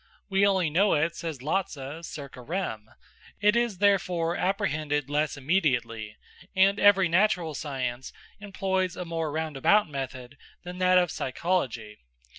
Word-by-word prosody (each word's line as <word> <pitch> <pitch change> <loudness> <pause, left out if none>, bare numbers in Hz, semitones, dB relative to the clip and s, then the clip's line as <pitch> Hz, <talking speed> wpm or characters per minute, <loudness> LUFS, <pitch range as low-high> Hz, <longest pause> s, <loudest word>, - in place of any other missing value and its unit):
We 195 +1 +4
only 185 -5 +1
know 195 +6 +3
it, 160 +3 0
says 155 -6 -6
Lotze, 155 -2 -3
circa 140 -4 -9
rem. 120 - -4 0.5
It 210 +2 +4
is 235 -5 +1
therefore 180 -4 +2
apprehended 155 -8 -1
less 150 0 0
immediately, 120 - -1 0.4
and 195 +2 +4
every 195 -2 +5
natural 175 -2 +2
science 130 -4 -4 0.3
employs 190 -3 -2
a 180 - -4
more 165 -2 -3
roundabout 160 +6 +2
method 135 -2 -6 0.3
than 180 0 -8
that 185 0 +4
of 175 -3 +3
psychology. 130 -8 -2
165 Hz, 130 wpm, -27 LUFS, 140-190 Hz, 0.5 s, every